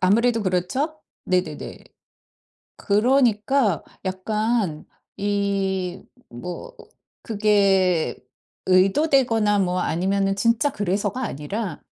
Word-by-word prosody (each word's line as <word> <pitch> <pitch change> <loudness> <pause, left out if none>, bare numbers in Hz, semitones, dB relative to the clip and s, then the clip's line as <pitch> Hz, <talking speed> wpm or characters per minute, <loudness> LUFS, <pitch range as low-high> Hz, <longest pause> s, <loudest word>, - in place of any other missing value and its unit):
아무래도 225 +5 +3
그렇죠? 205 - -1 0.3
네네네. 180 -5 -2 1.0
그러니까 225 - +2 0.2
약간 205 -2 -1 0.3
이 195 -2 -1 0.3
뭐 180 - -8 0.5
그게 200 -5 +2 0.5
의도되거나 210 +2 +3
뭐 180 -1 0
아니면은 195 +4 0
진짜 230 +7 +2
그래서가 205 +3 -2
아니라 200 - -4
200 Hz, 195 characters per minute, -23 LUFS, 185-230 Hz, 1.0 s, 아무래도